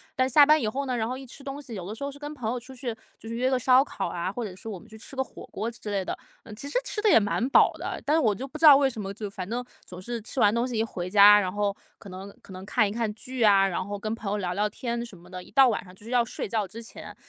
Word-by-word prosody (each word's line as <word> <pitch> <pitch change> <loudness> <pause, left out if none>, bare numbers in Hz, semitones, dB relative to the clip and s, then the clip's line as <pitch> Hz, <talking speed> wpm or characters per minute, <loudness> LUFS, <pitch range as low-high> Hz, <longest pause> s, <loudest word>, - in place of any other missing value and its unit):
但 255 0 +2
是 - - -10
下 295 -1 +8
班 305 +1 +5
以 225 - 0
后 275 +6 -2
呢， 255 -2 -1
然 220 -1 -1
后 255 +2 -4
一 270 - -9
吃 270 +2 -13
东 280 +1 -6
西 265 -5 -10
有 185 -4 -6
的 215 - -5
时 280 - -8
候 280 - -3
是 285 - -13
跟 295 0 -6
朋 240 -6 -3
友 245 - -2
出 260 +3 -13
去， 245 -2 -4 0.2
就 - - -13
是 230 - -4
约 255 +2 +1
个 260 - +3
烧 255 +2 +5
烤 - - -4
啊， 175 +2 -3
或 240 +3 -4
者 190 -4 -6
是 190 - -12
我 205 -5 -5
们 - - -17
去 220 - -12
吃 250 +5 -12
个 265 - 0
火 - - -12
锅 225 - -3
之 230 -2 -9
类 195 -2 0
的。 - - -4 0.3
呃， - - -12
其 255 +6 -8
实 285 - -1
吃 455 - -4
得 435 - +2
也 - - +7
蛮 220 +3 0
饱 - - +6
的， - - -5
但 300 +2 +2
是 - - +4
我 220 -9 +3
就 260 +7 -6
不 280 +3 -9
知 320 - +2
道 290 - +11
为 275 -1 +3
什 235 - -8
么， 195 0 -5
就 210 0 -6
反 190 -2 -6
正 240 +4 -3 0.2
总 180 0 -10
是 235 +5 -4
吃 260 - -6
完 210 -2 +5
东 235 +2 0
西 250 - -4
一 220 - +2
回 180 -6 -5
家， 205 +1 +8
然 185 -3 -1
后 205 -1 0 0.3
可 200 - -12
能 190 +2 -9
可 - - -15
能 185 +1 -9
看 215 -1 +2
一 - - -4
看 225 0 -1
剧 250 +2 -4
啊， 195 -2 +6
然 185 0 -2
后 205 +1 -5
跟 215 +2 -3
朋 220 - -8
友 210 - 0
聊 180 -2 -2
聊 210 +2 +1
天 235 +2 -4
什 220 -5 -12
么 175 +1 -17
的， 185 0 -7
一 - - -17
到 270 -2 +6
晚 220 - -2
上 180 - -14
就 200 - -17
是 230 - -10
要 245 -2 +3
睡 - - -5
觉 215 -2 -1
之 230 +4 -9
前， 225 - -11
225 Hz, 370 characters per minute, -26 LUFS, 200-255 Hz, 0.3 s, 道